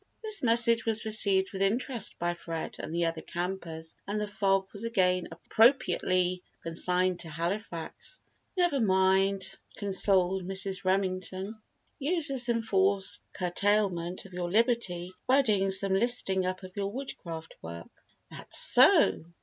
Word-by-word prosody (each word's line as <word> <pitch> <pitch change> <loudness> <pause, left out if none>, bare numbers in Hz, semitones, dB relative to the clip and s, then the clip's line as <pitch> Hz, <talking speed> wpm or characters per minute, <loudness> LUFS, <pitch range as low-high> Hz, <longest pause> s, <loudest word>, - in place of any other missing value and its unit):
This 430 -2 +2
message 230 -1 +4
was 225 -1 +1
received 200 -3 +5
with 190 - -5
interest 230 +3 0
by 175 0 -2
Fred 165 -1 -7
and - - -7
the 170 +1 -1
other 165 -1 -3
campers 170 -3 -6
and 205 +1 -2
the 210 - -3
fog 195 -2 0
was 205 +1 -7
again 185 -5 0
appropriately 185 -3 +1 0.2
consigned 180 +2 -1
to 165 - -7
"Halifax." 170 - -5 0.4
"Never 350 -6 +1
mind," 190 -1 +1 0.2
consoled 190 -2 0
Mrs. 190 +1 -1
Remington; 190 +2 -2 0.4
"use 310 +2 +2
this 250 -3 +4
enforced 200 -4 +1
curtailment 185 -1 -1
of 190 - -14
your 175 -1 -4
liberty 205 -6 0
by 270 +2 +4
doing 200 -5 +1
some 190 0 +2
listing 195 -3 +2
up 185 +1 -5
of 185 0 -11
your 200 -1 -3
Woodcraft 170 -10 -8
work." 85 +1 -10 0.4
"That's - - -2
so! 95 - +5
190 Hz, 135 wpm, -28 LUFS, 180-220 Hz, 0.4 s, received